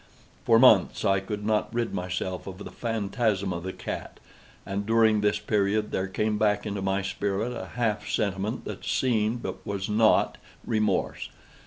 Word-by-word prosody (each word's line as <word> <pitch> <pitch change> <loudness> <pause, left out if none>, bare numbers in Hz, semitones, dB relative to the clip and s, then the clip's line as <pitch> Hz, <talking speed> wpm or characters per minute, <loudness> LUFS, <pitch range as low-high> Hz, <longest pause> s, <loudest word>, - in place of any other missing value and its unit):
For 115 - +6
months 115 -6 +5
I 95 -1 +3
could 105 +2 -5
not 110 0 +1
rid 120 0 -1
myself 90 +1 -3
of 95 -1 -7
the 100 - -8
phantasm 105 -3 -1
of 85 - -4
the 95 +2 -4
cat; - - -6 0.5
and, 100 +1 -2
during 110 -1 +3
this 105 0 +2
period, 105 0 0
there 95 0 -1
came 105 +2 -1
back 105 -1 +2
into 100 -2 -3
my 95 0 0
spirit 100 +4 -2
a - - -6
half 115 -4 -1
sentiment 100 +3 -1
that - - -6
seemed, 115 -2 0
but - - -5
was 100 -1 -3
not, 110 +1 +3 0.3
remorse. 110 -4 0
105 Hz, 165 wpm, -27 LUFS, 95-110 Hz, 0.5 s, For